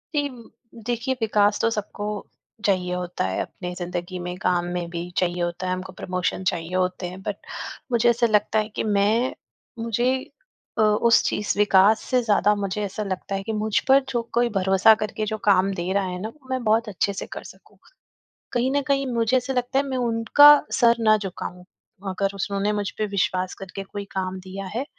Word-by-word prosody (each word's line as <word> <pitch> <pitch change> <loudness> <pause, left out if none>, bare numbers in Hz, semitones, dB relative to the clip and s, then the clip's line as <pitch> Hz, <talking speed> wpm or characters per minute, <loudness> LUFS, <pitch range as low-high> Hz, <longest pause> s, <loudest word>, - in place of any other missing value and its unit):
जी, 290 -1 +1 0.6
देखिए, 245 +2 -1
विकास 210 -1 +2
तो 230 - +3
सबको 210 -1 -4 0.6
चाहिए 180 -3 +1
होता 180 - -3
है, 95 - -1
अपनी 180 -1 -6
ज़िंदगी 175 0 -4
में, 180 0 -5
काम 180 -2 +1
में 175 -1 -3
भी 175 +1 -5
चाहिए 175 -1 0
होता 175 +2 -3
है, 185 - 0
हमको 185 +1 -5
प्रमोशन 185 +1 -2
चाहिए 170 +1 -5
होते 180 0 -1
हैं। 185 +1 -10
बट 205 -1 -3 0.5
मुझे 240 0 +4
ऐसा 235 0 +3
लगता 215 0 +2
है 215 +1 -2
कि - - -1
मैं 215 +4 +2 0.5
मुझे 240 +3 +1 0.6
अ, - - +3
उस 215 +2 +4
चीज़ 210 - -1
विकास 205 +1 +5
से 255 -1 +3
ज़्यादा 210 -1 +3
मुझे 200 +1 -3
ऐसा 205 +2 -3
लगता 195 0 -4
है 195 - -3
कि 220 - -3
मुझ 215 0 +1
पर 270 +1 +6
जो 240 -2 0
कोई 240 0 +2
भरोसा 195 +3 +5
करके 215 0 -3
जो 220 - -1
काम 195 -1 +4
दे 175 +1 -3
रहा 200 - +2
है 180 0 -4
ना, 220 - -3
वो 265 0 -20
मैं 260 -2 -2
बहुत 220 +1 +2
अच्छे 200 +1 -1
से - - -5
कर - - -7
सकूँ। - - -16 0.7
कहीं 250 +1 +1
न 285 0 +2
कहीं 275 -1 +2
मुझे 230 +2 +2
ऐसा 255 +2 -2
लगता 250 +2 0
है, - - +1
मैं 265 -1 -3
उनका 235 +4 +6 0.2
सर 235 -1 +4
ना 215 -1 +5
झुकाऊँ, 180 -2 -6 0.4
अगर 195 +1 -1
उन्होंने 200 +1 -1
मुझ 205 -1 -1
पे 215 - 0
विश्वास 185 -1 0
करके 195 +1 -6
कोई 200 0 -7
काम 190 0 -3
दिया 190 +1 -7
है, 260 +4 -1
205 Hz, 195 wpm, -24 LUFS, 185-230 Hz, 0.7 s, पर